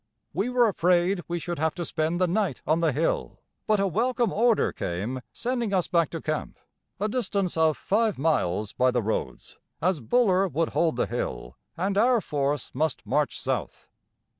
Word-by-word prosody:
We 195 +10 0
were 245 -2 +4
afraid 180 -1 +2
we 175 - -2
should 175 -1 -4
have 160 0 0
to 175 - -3
spend 160 +2 -1
the 185 - +4
night 185 - -1
on 160 +2 +2
the 165 -2 +2
hill, 155 +5 -1 0.3
but 215 -1 +3
a 195 - +2
welcome 235 +5 +1
order 230 0 +3
came 105 +10 -3
sending 235 -5 -1
us 180 - +1
back 170 -3 +2
to 165 - -5
camp, 155 0 -3 0.4
a 210 - 0
distance 205 -6 -1
of 160 -3 +3
five 215 - +1
miles 105 - 0
by 130 0 +3
the 120 -2 0
roads, 100 - -4 0.2
as 180 0 +1
Buller 195 - +3
would 165 -2 -1
hold 165 -6 +1
the 120 - +1
hill, - - -4 0.2
and 195 +3 0
our 245 +2 +4
force 145 - -2
must 150 0 -1
march 150 -1 0
south. 125 - -3
170 Hz, 180 wpm, -26 LUFS, 145-200 Hz, 0.4 s, were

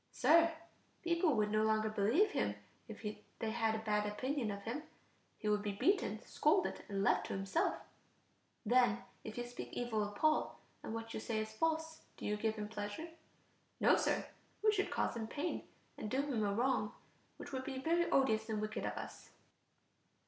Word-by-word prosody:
Sir, 330 +1 +5 0.5
people 340 -3 +3
would 210 -1 +2
no 215 0 +3
longer 220 0 +3
believe 235 - +3
him - - 0 0.3
if - - -9 0.3
they 225 -2 -2
had 225 -1 +1
a 220 0 -5
bad 210 -1 +2
opinion 260 +2 -1
of 200 0 -4
him; 240 +8 -3 0.6
he 215 - -4
would 210 0 +3
be 205 -1 -2
beaten, 230 - +1
scolded, 345 +8 +2
and 195 -1 0
left - - +3
to - - -3
himself. 195 - +1 0.9
Then 245 -1 +4 0.2
if 220 - -7
you 245 - -1
speak 245 0 -7
evil 235 -3 -1
of 205 0 -3
Paul, 310 0 +2 0.2
and 220 - -4
what 225 0 -5
you - - -2
say 220 0 -2
is 215 0 -2
false, 320 +5 0 0.2
do - - -7
you 210 - +1
give 220 +1 0
him 210 -1 -4
pleasure? 210 +9 -5 0.7
No, - - +6
Sir, - - +1 0.4
we 430 - +6
should 395 -2 +1
cause - - 0
him 225 -1 -3
pain, 295 +8 -3 0.3
and 215 - -3
do 265 +4 +1
him 255 -7 0
a 200 - +1
wrong, 230 -1 +1 0.4
which - - -8
would 260 -1 -2
be 265 -1 -4
very 335 +5 +2
odious 220 -5 +3
and 215 -1 0
wicked 215 0 -3
of - - -2
us. - - -8
225 Hz, 185 wpm, -36 LUFS, 215-295 Hz, 0.9 s, No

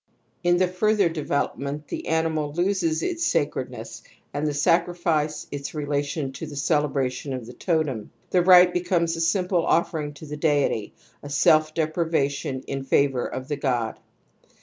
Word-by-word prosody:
In 175 0 +4
the 185 0 +3
further 200 +1 +2
development 145 -2 -2
the - - -5
animal 160 -2 0
loses 175 -2 0
its 340 -2 -2
sacredness - - -2 0.3
and 145 +1 -1
the 150 - -1
sacrifice 165 -1 +1
its 140 +2 -5
relation 145 -1 -2
to 155 +4 -7
the 145 - -8
celebration 140 -3 0
of 125 -3 -5
the 120 - -10
totem; 155 - -1 0.2
the 180 - +4
rite 180 0 +7
becomes 175 -2 +1
a 165 - -3
simple 180 0 +1
offering 155 -4 0
to 150 - -10
the 150 0 -6
deity, 145 -8 0 0.3
a 145 - -8
self 155 +2 +3
deprivation 155 -5 -1
in 135 -1 -4
favour 135 -1 +2
of 130 0 -6
the 145 -1 -2
god. 120 -5 -1
155 Hz, 150 wpm, -24 LUFS, 140-170 Hz, 0.3 s, rite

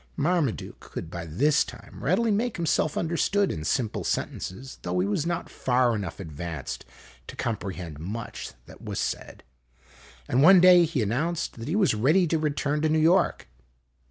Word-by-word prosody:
Marmaduke 155 -5 0
could 80 - -8
by 85 -2 -6
this 145 - +3
time - - -12
readily 235 -1 +2
make 220 +2 0
himself 160 -2 0
understood 185 +4 +1
in 75 - -5
simple 110 +6 -1
sentences, 130 +9 -4
though 90 0 -2
he 90 - +2
was 105 +11 -1
not 175 0 -2
far 125 -1 +1
enough 100 -4 -5
advanced 80 -4 -6 0.4
to - - -8
comprehend 90 -8 -4
much 105 +8 -6
that - - -14
was - - -4
said; - - -4 0.8
and 130 - +2
one 185 +5 +8
day 180 -1 +7
he 150 -7 -1
announced 150 +7 -2
that 115 - -6
he 165 - -1
was 205 - +3
ready 150 - +3
to 160 -1 0
return 150 -1 -1
to 155 - +2
New 155 - +2
York. 170 - +3
140 Hz, 165 wpm, -26 LUFS, -, 0.8 s, one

